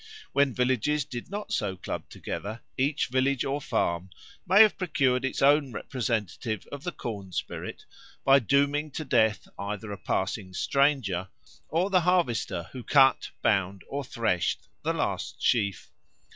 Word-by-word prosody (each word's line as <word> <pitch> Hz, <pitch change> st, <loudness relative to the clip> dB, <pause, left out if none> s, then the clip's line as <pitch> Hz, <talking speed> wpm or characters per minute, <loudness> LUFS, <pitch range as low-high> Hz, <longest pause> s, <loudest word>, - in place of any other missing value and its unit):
When 140 Hz, -1 st, +3 dB
villages 130 Hz, +3 st, +1 dB
did 120 Hz, -2 st, -7 dB
not 205 Hz, +2 st, -5 dB
so 100 Hz, -3 st, -1 dB
club -, -, -5 dB
together, 110 Hz, +3 st, -6 dB
each 140 Hz, +3 st, +1 dB
village 130 Hz, +1 st, +1 dB
or 140 Hz, +2 st, -1 dB
farm 85 Hz, -6 st, -1 dB, 0.4 s
may 195 Hz, +4 st, +9 dB
have 215 Hz, -, +3 dB
procured 135 Hz, -8 st, +1 dB
its 135 Hz, 0 st, -1 dB
own 140 Hz, -1 st, +5 dB
representative 110 Hz, -4 st, -2 dB
of 145 Hz, 0 st, -7 dB
the 175 Hz, -, -2 dB
corn 100 Hz, -, -6 dB
spirit -, -, -5 dB, 0.4 s
by 135 Hz, 0 st, +7 dB
dooming 140 Hz, +5 st, +2 dB
to 155 Hz, -, -4 dB
death 110 Hz, -4 st, +2 dB
either 105 Hz, +1 st, -4 dB
a 100 Hz, -, -6 dB
passing 95 Hz, -1 st, -2 dB
stranger 130 Hz, -11 st, +1 dB, 0.4 s
or 180 Hz, +5 st, +1 dB
the 185 Hz, -2 st, +5 dB
harvester 120 Hz, -, +1 dB
who 130 Hz, -2 st, -7 dB
cut, 135 Hz, 0 st, +4 dB
bound, 95 Hz, -2 st, +1 dB
or 140 Hz, 0 st, -3 dB
threshed 115 Hz, -8 st, -1 dB
the -, -, 0 dB
last -, -, -2 dB
sheaf. 100 Hz, -5 st, 0 dB
130 Hz, 145 wpm, -28 LUFS, 105-145 Hz, 0.4 s, may